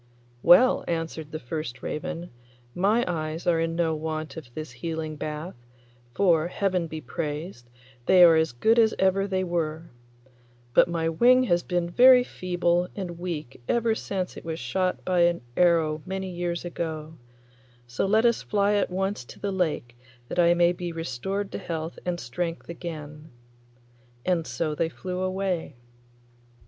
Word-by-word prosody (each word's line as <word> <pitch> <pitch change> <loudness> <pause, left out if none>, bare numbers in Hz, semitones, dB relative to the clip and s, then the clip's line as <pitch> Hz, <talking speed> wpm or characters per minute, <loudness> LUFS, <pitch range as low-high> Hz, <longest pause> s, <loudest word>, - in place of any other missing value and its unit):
'Well,' 245 - +6
answered 165 -2 -3
the 155 - -3
first 130 -2 -6
raven, 175 +2 -4 0.4
'my 210 +6 +2
eyes 160 -1 -3
are 170 -2 +3
in 165 0 -1
no 165 -1 +1
want 155 -1 -4
of 150 -7 -9
this 155 -4 -6
healing 155 +4 -4
bath, 150 +3 -5 0.6
for, 170 -4 +3
Heaven 180 -2 -1
be 160 0 -6
praised, 150 -5 -5 0.4
they 185 -1 +7
are 165 -2 +8
as 160 -2 +2
good 220 - +3
as 220 -1 +4
ever 190 +1 +2
they 190 -1 0
were; 165 -2 -3 0.8
but - - +6
my 165 -1 -1
wing 245 +10 +5
has 175 -8 +2
been 175 -1 -1
very 250 +7 +7
feeble 175 -4 0
and 175 -4 -5
weak 155 -8 -5
ever 235 -1 +2
since 190 -4 -3
it - - -9
was 160 -1 -4
shot 185 +10 -1
by 180 -1 +1
an 170 0 +3
arrow 165 -3 +3
many 190 0 -3
years 175 0 -3
ago, 160 -3 -5 0.7
so 120 +10 -2
let 220 +4 +3
us 235 -1 +3
fly 205 0 +1
at 205 - +1
once 190 -3 -2
to - - -13
the 200 - -2
lake 160 -10 -1 0.3
that - - -2
I 170 0 +5
may 175 0 +4
be 175 -1 -4
restored 165 +6 -3
to - - -4
health 165 0 -5
and 175 -1 -1
strength 170 +8 -4
again.' 155 -3 -7 1.0
And 170 -3 +1
so 155 -2 -2
they 160 +2 0
flew 180 +2 -5
away. 185 -5 -2
170 Hz, 160 wpm, -26 LUFS, 160-185 Hz, 1.0 s, are